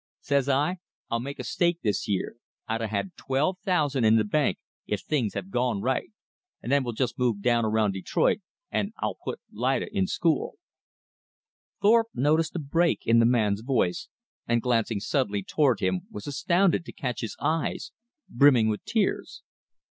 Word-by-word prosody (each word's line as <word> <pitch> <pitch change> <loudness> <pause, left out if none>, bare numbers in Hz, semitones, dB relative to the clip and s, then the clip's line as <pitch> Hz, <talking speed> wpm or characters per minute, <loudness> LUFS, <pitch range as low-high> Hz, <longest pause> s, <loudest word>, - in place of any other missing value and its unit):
Says 140 -1 0
I, 145 +7 +1 0.3
I'll 115 - +1
make 140 +4 -6
a - - -5
stake 170 +7 0
this 105 -4 0
year 100 +1 -2 0.3
I'd 115 +1 -2
a 115 - -1
had 100 -2 -3
twelve 150 +8 0
thousand 150 - +1
in 110 0 +5
th' 105 -1 +1
bank, 140 -4 +1 0.3
if 105 - -2
things'd 125 -9 -1
have 95 -1 -5
gone 120 -3 0
right 130 +5 -1 0.5
and 125 - -5
then 140 -1 +3
we'll 120 -2 -3
jest 120 0 -2
move 115 -5 0
down 120 -2 +3
around 110 -1 +2
Detroit 95 -1 +1 0.3
an' - - -1
I'll - - -3
put - - -5
Lida 130 - -1
in 190 -1 +2
school." 165 -5 0 1.3
Thorpe 225 +2 +5
noticed 155 +6 +1
a - - -1
break 165 +4 +1
in 115 +1 +5
the 115 - +5
man's 110 -4 +2
voice, 115 -8 0 0.4
and 120 0 +2
glancing 115 -3 0
suddenly 105 -5 0
toward 130 -3 +1
him 95 -1 -1
was 105 - -8
astounded 175 +5 +2
to - - -8
catch 125 -4 -4
his 115 - -5
eyes 155 +3 -1 0.4
brimming 120 -4 +5
with 105 - -3
tears. 215 -4 -1
125 Hz, 170 wpm, -26 LUFS, 110-150 Hz, 1.3 s, in